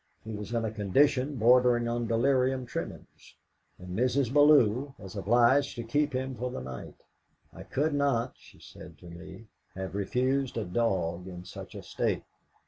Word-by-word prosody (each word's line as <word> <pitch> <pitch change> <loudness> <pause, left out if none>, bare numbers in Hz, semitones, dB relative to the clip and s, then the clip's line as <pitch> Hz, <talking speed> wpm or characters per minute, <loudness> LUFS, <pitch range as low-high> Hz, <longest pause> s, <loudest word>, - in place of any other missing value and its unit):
He 110 - -7
was 105 +1 -6
in 115 -1 0
a 110 - -2
condition 130 +7 +2
bordering 120 0 +4
on 120 0 -1
delirium 130 +2 +1
tremens, 125 - -8 0.4
and 90 0 -8
Mrs. 125 +2 +1
Bellew 140 -3 +4
was 95 0 -10
obliged 120 +7 +3
to 120 - -5
keep 145 +6 0
him 130 +1 -2
for 125 +1 -4
the - - -5
night. 65 -1 -8 0.6
'I - - -10
could 150 +3 0
not,' 135 -4 +1
she - - -19
said - - -13
to - - -17
me, 95 +5 -11 0.3
'have 95 0 -5
refused 130 +7 0
a 110 - -2
dog 90 -4 -1
in 90 -1 -9
such - - -10
a - - -8
state.' - - -2
120 Hz, 165 wpm, -29 LUFS, 100-130 Hz, 0.6 s, bordering